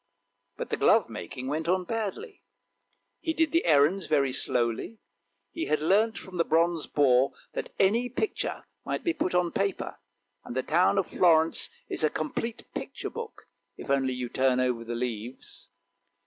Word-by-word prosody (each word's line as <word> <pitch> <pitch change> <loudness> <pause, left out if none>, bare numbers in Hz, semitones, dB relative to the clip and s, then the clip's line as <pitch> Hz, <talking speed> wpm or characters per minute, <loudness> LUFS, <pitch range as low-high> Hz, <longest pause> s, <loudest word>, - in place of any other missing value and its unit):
But - - -5
the - - 0
glovemaking 130 -2 +1
went 155 +4 -2
on 185 +1 +2
badly; 225 - -4 0.8
he 320 - -2
did 320 -2 +2
the 330 +1 +2
errands 160 +5 +4
very 140 -4 +2
slowly; 120 - 0 0.5
he 330 - -3
had 155 - +1
learnt 205 +8 +2
from 185 -1 -8
the 170 - +4
bronze 165 0 +1
boar 135 -2 +3 0.2
that - - -4
any 230 +6 +3
picture 385 - -3 0.2
might - - -3
be 340 - +1
put 185 - -1
on 175 -1 +2
paper, 195 0 -2 0.4
and 120 - -8
the 130 - 0
town 175 +4 +3
of 195 - +2
Florence 165 -2 +3 0.2
is - - -3
a 155 - +4
complete 225 +11 -4
picture - - -5
book, 460 -1 -7 0.3
if - - -9
you - - +4
only 130 -2 -1
turn 130 0 +2
over 125 -2 0
the 120 +1 -4
leaves. 120 0 -5
160 Hz, 160 wpm, -28 LUFS, 130-200 Hz, 0.8 s, errands